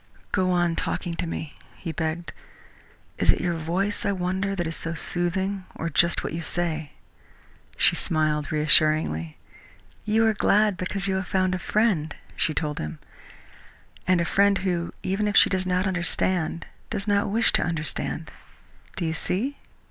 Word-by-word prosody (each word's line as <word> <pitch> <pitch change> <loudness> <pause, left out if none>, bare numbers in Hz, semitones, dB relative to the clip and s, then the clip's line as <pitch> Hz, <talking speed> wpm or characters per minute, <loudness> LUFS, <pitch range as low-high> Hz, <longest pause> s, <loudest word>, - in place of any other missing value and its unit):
"Go 185 -2 +2
on 175 -2 +2
talking 175 +1 -2
to 170 +1 -3
me," 160 -2 -5 0.2
he 170 - -5
begged. 160 +2 -3 0.9
"Is - - +1
it - - +5
your 175 - 0
voice, 175 +6 -1
I 200 - +1
wonder, 190 +1 -1
that 175 -2 -1
is 165 0 -3
so 165 0 -4
soothing, 190 +4 -2
or 165 +1 -3
just 170 +3 +3
what - - -4
you 165 - -3
say?" 160 -3 0 0.8
She - - +5
smiled 155 -2 0
reassuringly. 155 - +3 0.7
"You 220 +1 +3
are 220 - +4
glad 210 -1 +3
because 195 +2 -2
you 190 -1 +1
have 190 -1 -3
found 185 -1 +1
a 185 - -1
friend," 190 -8 +1 0.2
she - - +2
told 150 -2 -2
him, 75 0 -5 1.1
"and 185 -1 +4
a 170 - +1
friend 200 +2 +3
who, 175 -2 -1
even 195 +3 0
if 205 - +2
she - - +7
does 185 -1 0
not 185 +1 +1
understand, 175 -2 -1 0.2
does 205 -2 -3
not 200 -1 +2
wish 225 +3 +3
to - - +5
understand. 160 -3 -3 0.6
Do 170 - -2
you 160 - 0
see?" 225 - -2
175 Hz, 165 wpm, -25 LUFS, 165-195 Hz, 1.1 s, she